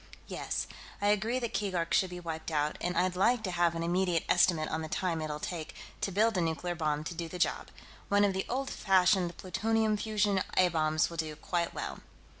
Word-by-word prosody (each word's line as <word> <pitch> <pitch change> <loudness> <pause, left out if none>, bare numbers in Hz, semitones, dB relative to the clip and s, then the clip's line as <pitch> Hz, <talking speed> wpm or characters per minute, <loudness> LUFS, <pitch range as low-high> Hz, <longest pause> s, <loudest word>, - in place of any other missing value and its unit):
"Yes. - - -3 0.3
I 205 - +2
agree 215 +4 +2
that 235 -2 -3
Keegark 180 -5 -1
should 190 - +3
be 180 0 -7
wiped 160 -2 -5
out, 150 -1 0
and 180 0 -1
I'd 180 0 +2
like 225 +5 +3
to 185 - -2
have 175 -1 +2
an 165 - -2
immediate 175 -1 +1
estimate 170 -3 +3
on 160 - -2
the 160 - -4
time 170 -2 -1
it'll 150 -1 -3
take 160 -1 -5 0.3
to 195 - -1
build 220 +3 +3
a - - +2
nuclear 165 +2 -1
bomb 155 -3 -1
to 165 - -5
do 165 0 -5
the 180 - -6
job. 175 - 0 0.4
One 205 0 +5
of 200 - +1
the 190 0 -2
old 265 +2 -2
fashioned 185 -2 +3
plutonium 215 +3 +1
fission 210 -2 +1 0.2
A 185 -1 +6
bombs 155 -1 +1
will 170 - -7
do 155 -1 -2
quite 170 +2 -2
well." - - -4
180 Hz, 215 wpm, -31 LUFS, 165-200 Hz, 0.4 s, A